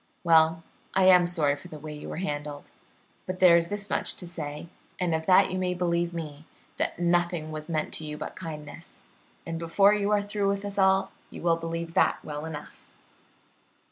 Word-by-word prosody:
Well, 165 -1 +4 0.3
I 190 - +4
am 180 -2 +7
sorry 155 -5 +1
for 145 - -12
the 155 - -9
way 150 +1 -8
you 150 - -8
were - - -5
handled, 145 -4 -5 0.6
but 185 0 -3
there 180 -2 +7
is 170 0 +3
this 205 +1 -5
much - - 0
to 180 - -9
say, 150 -2 -6 0.3
and 180 -3 0
of 160 0 -2
that 190 0 +5
you 185 - -2
may 180 -1 -1
believe 175 -1 0
me, 155 -2 -7 0.3
that - - -1
nothing 175 -2 0
was 155 +1 -7
meant 155 -2 -2
to - - -4
you 150 -1 -5
but - - -6
kindness, 160 -1 -9 0.4
and 165 0 -4
before 195 +5 +4
you 205 -1 0
are 205 -1 +2
through 205 -1 -1
with 200 0 -2
us 200 0 -3
all 190 0 +3 0.2
you - - -10
will 170 -1 +4
believe 165 0 -5
that - - +3
well 150 0 -5
enough." 155 -2 -9
170 Hz, 200 wpm, -27 LUFS, 155-185 Hz, 0.6 s, am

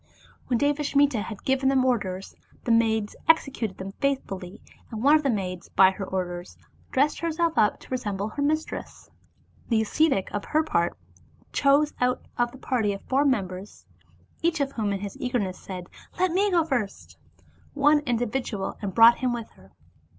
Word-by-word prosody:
When 245 - +1
Devasmita 285 -3 +2
had 215 -1 -7
given 265 0 +2
these 270 - +3
orders, 195 -7 -1 0.3
the 235 - 0
maids 220 -2 +2
executed 270 -10 +2
them 190 +1 -6
faithfully, 195 -10 -2 0.3
and 220 0 -5
one 290 +3 +7
of 310 - +3
the 280 - 0
maids, 185 -6 -3
by 190 0 +6
her 195 - -6
orders, 180 -1 -4 0.3
dressed 285 +3 +1
herself 335 0 0
up 210 - +3
to - - -15
re 255 - +1
semble 205 -2 -3
her 285 - -5
mistress. 310 +2 -3 0.6
The 230 -3 +3
ascetic 270 -3 +1
for 205 - -4
her 310 +1 +2
part 170 - 0 0.6
chose 285 +2 +3
out 250 0 +1
of 240 0 0
the 260 - -12
party 225 -6 0
of 195 - -8
four 275 +2 +1
merchants 195 -6 -2 0.6
(each 335 -1 +1
of 275 -1 0
whom 215 -6 -1
in 195 -1 -2
his 200 -1 -6
eager 250 -1 -1
ness 190 -5 -3
said 185 -2 -7
— - - -18
" - - -25
Let 370 -1 +2
me 395 +4 +2
go 345 -3 +3
first 195 - -3
" 85 -2 -31
— 85 - -33
) - - -31
one 295 +1 +5
individual, 240 -4 -2
and 195 -3 -4
brought 230 +1 +8
him 250 -2 0
with 235 -2 -6
her. - - -20
240 Hz, 190 wpm, -26 LUFS, 195-280 Hz, 0.6 s, brought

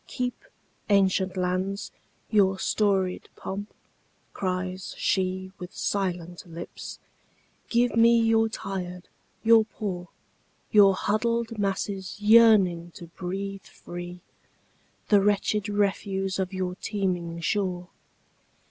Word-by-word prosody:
"Keep, 250 -2 -4 0.4
ancient 190 -1 +3
lands, 185 +2 -1 0.4
your 195 -3 +4
storied 190 -2 0
pomp!" 205 +2 -6 0.6
cries 185 0 -3
sheWith 185 -1 -2
silent 180 -3 -2
lips. 170 0 -8 0.7
"Give 240 0 +2
me 230 +1 +6
your 225 0 +3
tired, 180 -4 -6 0.3
your 225 0 +7
poor, 190 -5 -5 0.6
Your 200 -2 +7
huddled 230 +3 0
masses 195 -1 -2
yearning 210 -6 +5
to 170 - -10
breathe 195 +3 -5
free, 175 0 -9 0.9
The 205 -2 +6
wretched 210 +1 +1
refuse 195 -1 0
of 190 0 -1
your 185 -1 -2
teeming 180 -4 -2
shore. 180 0 -1
195 Hz, 95 wpm, -26 LUFS, 180-210 Hz, 0.9 s, your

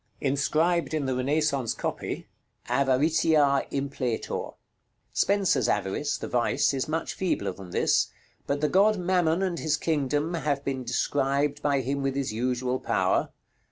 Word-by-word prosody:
Inscribed 155 +5 +1
in 150 -3 -1
the 130 - 0
Renaissance 140 -2 0
copy, - - -4 0.4
"AVARITIA 140 +1 +3
IMPLETOR." 135 -4 -3 0.6
Spenser's 195 - +2
Avarice 105 +8 -1
(the - - -6
vice) 120 +3 +1
is 135 -1 -1
much 160 +1 -2
feebler 170 - -1
than 95 -1 -11
this; - - +2 0.4
but 140 +1 -1
the 150 - +3
god 205 +5 +4
Mammon 180 -1 +1
and 180 -3 -1
his 150 -2 +1
kingdom 150 +1 0
have 145 -4 -1
been 130 -2 -2
described 140 +3 0
by 140 -2 +1
him 140 +2 -2
with 135 -1 -1
his 135 -5 -2
usual 125 +2 -1
power. - - +1
140 Hz, 140 wpm, -27 LUFS, 130-160 Hz, 0.6 s, god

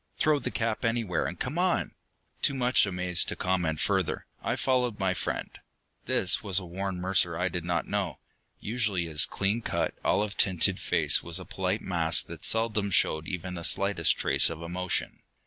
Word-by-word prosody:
"Throw 155 -2 +2
the - - -3
cap 115 -1 -2
anywhere 115 -6 0
and - - -7
come - - -3
on!" - - +1 0.5
Too 140 - +1
much 125 -4 +2
amazed 90 -2 +1
to - - -2
comment 90 -4 -1
further, - - -1 0.2
I - - -1
followed 125 -4 0
my 95 -1 0
friend. 80 -4 -4 0.5
This 95 - +3
was 100 -4 +3
a 95 - +2
Warren 95 +2 -4
Mercer 90 -2 +1
I 90 +2 0
did 90 -2 -4
not 85 -1 -1
know. 95 -8 -2 0.4
Usually 105 -6 -1
his 80 0 +3
clean 100 +4 -1
cut, 85 -7 -2
olive 105 -1 0
tinted 90 -4 +2
face - - +3
was 85 +1 0
a 90 - -9
polite 95 +2 -2
mask 85 -3 +2
that - - -10
seldom 110 -2 +2
showed 80 -3 +2
even 90 0 -4
the 85 -1 -6
slightest 100 -3 +2
trace - - +2
of 80 0 -7
emotion. 90 +2 -3
95 Hz, 180 wpm, -28 LUFS, 85-105 Hz, 0.5 s, This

